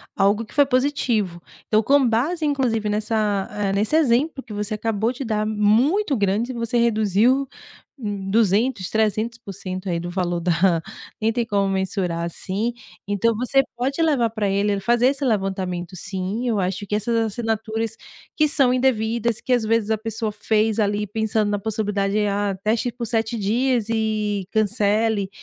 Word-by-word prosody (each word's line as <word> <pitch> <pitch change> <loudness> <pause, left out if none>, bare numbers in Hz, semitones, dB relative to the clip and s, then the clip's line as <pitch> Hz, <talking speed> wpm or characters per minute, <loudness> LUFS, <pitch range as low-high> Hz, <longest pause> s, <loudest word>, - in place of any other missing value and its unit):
algo 205 +3 +2
que - - -15
foi 285 - +6
positivo. 250 -9 0 0.3
Então, 215 0 +3
com 275 +2 +4
base, 300 +9 0
inclusive 245 -7 0
nessa, 210 -2 0
eh, 205 -2 -1
nesse 210 +9 +1
exemplo 280 -1 +2
que 220 - -10
você 210 +1 -3
acabou 220 +1 0
de 260 +2 -6
dar, 215 -3 -1
muito 240 - +2
grande, 205 +5 0
você 235 -1 -2
reduziu 230 +4 +2 0.5
m 200 -3 -4
200, 215 -1 +2
300% 215 -3 -2
aí 170 -1 0
do 175 - -5
valor 175 -1 -1
da, 175 +1 0 0.7
nem 225 +1 +2
tem 235 0 0
como 200 -3 +1
mensurar 190 -3 -1
assim. 190 +6 -2 0.3
Então 205 +3 +1
você 250 +4 +2
pode 270 +6 -1
levar 280 -8 +2
para 215 -2 -2
ele 200 +1 +1
fazer 240 +4 +3
esse 275 +1 0
levantamento, 190 -5 -2
sim. 195 +6 -3
Eu 220 -4 +1
acho 190 +2 -3
que 210 - -1
essas 215 +3 -1
assinaturas 225 0 -2 0.4
que 305 - +4
são 275 -4 +3
indevidas, 235 -2 +1
que - - -4
às 245 -2 +3
vezes 220 -1 +1
a 220 - +2
pessoa 220 0 -3
fez 215 +1 0
ali 210 0 +1
pensando 215 0 0
na 205 - 0
possibilidade, 205 -1 -1
ah, 200 -1 -1
teste 220 +3 +1
por 240 0 -5
7 225 +1 -1
dias 230 +2 +1
e 215 -3 -1
cancele. 215 -1 +1
220 Hz, 160 wpm, -22 LUFS, 200-235 Hz, 0.7 s, foi